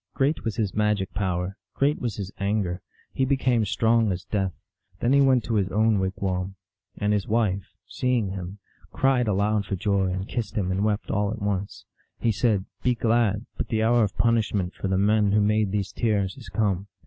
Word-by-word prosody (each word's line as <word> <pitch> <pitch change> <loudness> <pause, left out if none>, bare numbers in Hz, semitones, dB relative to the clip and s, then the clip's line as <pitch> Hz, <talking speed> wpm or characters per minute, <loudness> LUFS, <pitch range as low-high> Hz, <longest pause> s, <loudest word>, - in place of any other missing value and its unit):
Great 140 +3 +1
was 110 -2 -2
his 105 -5 -1
magic 105 -3 0
power, 95 -1 -2 0.2
great 145 +2 +2
was 120 -5 -2
his 100 -1 -5
anger; 100 -3 -1 0.3
he 135 - 0
became 130 -3 +2
strong 110 +1 +2
as 90 +1 -3
death. 95 -3 -1 0.5
Then 120 +3 +2
he 140 - +6
went 130 -3 +4
to 115 - -3
his 100 -3 +1
own 110 0 +3
wigwam, 95 0 -2 0.4
and 105 0 +1
his 105 +2 0
wife, 105 -4 0 0.2
seeing 125 -5 0
him, 95 0 -6 0.3
cried 130 -3 +2
aloud 105 0 +1
for 95 - -1
joy, 100 0 +1
and 95 +2 -3
kissed 120 -3 -4
him 95 -3 0
and 95 +2 0
wept 105 -1 -1
all 105 0 +1
at 110 +1 -4
once. 100 -1 -3 0.3
He 115 - +2
said, 105 -2 +1
" - - -49
Be 125 -1 +2
glad, 115 -2 +1
but - - -2
the 110 -1 0
hour 120 +1 +4
of 100 -3 -2
punishment 105 -6 +1
for - - -4
the 95 0 +1
men 105 0 +3
who 105 - +4
made 105 -1 +2
these 100 -2 -1
tears 100 -4 0
is 130 - -11
come." 100 -3 0
105 Hz, 200 wpm, -25 LUFS, 95-115 Hz, 0.5 s, he